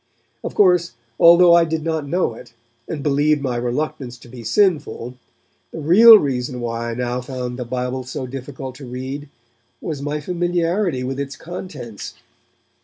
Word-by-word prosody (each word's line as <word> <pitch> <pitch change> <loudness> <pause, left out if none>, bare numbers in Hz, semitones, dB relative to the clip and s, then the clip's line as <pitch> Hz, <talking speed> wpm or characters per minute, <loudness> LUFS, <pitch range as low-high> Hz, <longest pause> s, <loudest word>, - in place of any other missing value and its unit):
Of - - -5
course, 180 -3 +3 0.3
although 170 +1 +7
I 170 0 +6
did 160 -1 -2
not 160 -3 -2
know 175 -5 0
it, 115 +1 -14 0.3
and 150 -4 -5
believed 145 0 +2
my 125 -3 -1
reluctance 125 +1 -3
to 120 - -16
be 120 -1 -10
sinful, 150 - 0 0.6
the - - -7
real 215 +9 +8
reason 125 -6 -2
why 115 0 -3
I 115 - -4
now 125 0 -2
found 125 -1 -5
the 125 - -4
Bible 125 +1 -3
so 130 +1 -5
difficult 130 0 -7
to 140 - -10
read 135 +3 -6 0.5
was 150 -4 -5
my 145 +1 -2
familiarity 175 -2 -1
with 135 +2 -4
its 140 -1 -4
contents. 150 - -8
140 Hz, 160 wpm, -20 LUFS, 125-165 Hz, 0.6 s, real